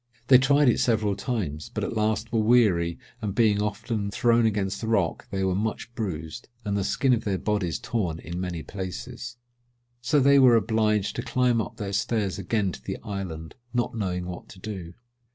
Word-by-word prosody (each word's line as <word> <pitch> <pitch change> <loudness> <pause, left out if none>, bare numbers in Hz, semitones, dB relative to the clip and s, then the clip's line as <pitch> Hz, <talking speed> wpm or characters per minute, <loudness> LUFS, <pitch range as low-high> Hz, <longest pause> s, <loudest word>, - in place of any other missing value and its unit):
They 130 -2 +9
tried 140 +2 +4
it 120 - +4
several 110 -4 +2
times, 100 - -3
but - - -3
at - - -3
last 110 +1 0
were 115 - +3
weary, 105 -8 +3 0.2
and 105 -3 -3
being 105 -3 +3
often 105 0 -2
thrown 115 +2 +3
against 100 -2 -1
the 110 - -3
rock 100 -7 0
they 95 -1 -2
were 95 -1 +1
much 110 +4 -3
bruised, 90 -2 -5 0.2
and 100 -1 -1
the 100 - 0
skin 130 +6 +2
of 115 - 0
their 100 -2 0
bodies 100 -5 -1
torn 90 -9 -2
in 85 +2 -6
many 85 -3 -4
places. 120 +6 -6 0.6
So 130 +5 +2
they 140 +1 +6
were 125 -3 +7
obliged 110 -2 +1
to - - 0
climb 125 -2 +2
up - - -7
their 100 -2 -4
stairs 100 -1 0
again 100 0 0
to 65 - -9
the - - -4
island, 95 -7 -5 0.2
not 120 - 0
knowing 90 -5 -2
what 90 0 -8
to - - -12
do. 95 -4 -6
105 Hz, 190 wpm, -26 LUFS, 95-115 Hz, 0.6 s, They